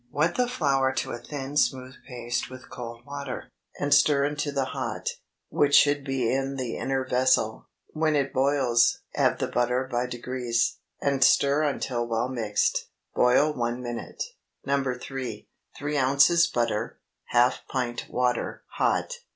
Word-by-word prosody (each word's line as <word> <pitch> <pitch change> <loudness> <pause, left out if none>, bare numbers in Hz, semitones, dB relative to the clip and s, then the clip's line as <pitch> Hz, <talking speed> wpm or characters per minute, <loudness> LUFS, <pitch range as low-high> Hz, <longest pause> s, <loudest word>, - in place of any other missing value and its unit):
Wet 155 +7 +1
the 250 -1 +1
flour 140 - +1
to - - -2
a 120 - -5
thin 140 0 -6
smooth 130 -3 +1
paste 120 -1 -3
with 130 0 -12
cold 120 0 -8
water, 140 -2 -6 0.3
and 145 0 +2
stir 140 0 +5
into 145 0 -2
the 140 -1 0
hot, - - -3 0.4
which 145 -1 +3
should 145 -1 +5
be 135 -4 0
in 135 +1 -1
the 125 -4 -3
inner 135 -1 -1
vessel. 125 -4 +1 0.3
When 155 -1 +1
it 140 -2 0
boils, 130 -3 +3
add - - +2
the - - -1
butter 125 +2 0
by 120 +1 0
degrees, 120 -1 -1 0.2
and 140 -1 +2
stir 140 +2 +4
until 130 -5 -1
well 115 +2 -1
mixed. 110 -5 0 0.3
Boil 135 +5 +4
one 120 -1 -2
minute. 120 -1 -5 0.4
NO. 135 -2 0
3. 125 -5 -6 0.3
3 145 +1 -2
ounces 140 +6 +5
butter. 115 -7 -2 0.3
Half 120 +1 +2
pint 120 -3 -3
water 125 -1 -1
(hot). - - +1
130 Hz, 150 wpm, -26 LUFS, 120-140 Hz, 0.4 s, stir